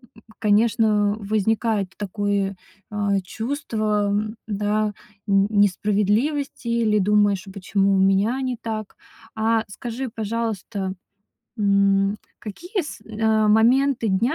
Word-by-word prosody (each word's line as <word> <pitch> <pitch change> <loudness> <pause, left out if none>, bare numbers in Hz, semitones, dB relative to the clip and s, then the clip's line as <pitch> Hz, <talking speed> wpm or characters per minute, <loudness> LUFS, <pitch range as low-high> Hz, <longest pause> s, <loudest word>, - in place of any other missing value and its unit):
М, 225 - -18 0.2
конечно 210 -1 +3
возникает 215 -1 0
такое, 200 -1 -1 0.4
а, 205 -1 +1
чувство, 215 -2 -2 0.4
да, 210 0 0 0.3
н 195 0 +3
несправедливости 210 +7 +1
или 230 -2 +2
думаешь: 205 -1 +2
а - - -8
почему 195 0 0
у 190 - +2
меня 195 +6 +2
не 255 -2 -2
так? 215 -2 -5 0.4
А, 220 0 +1
скажи, 240 +5 -5
пожалуйста, 215 -3 -3 0.7
м, 200 0 +3 0.2
какие 350 - -4
с 300 - -8 0.2
а, 220 -1 +3
моменты 240 +3 +3
дня 230 +9 +1
210 Hz, 110 wpm, -23 LUFS, 200-225 Hz, 0.7 s, конечно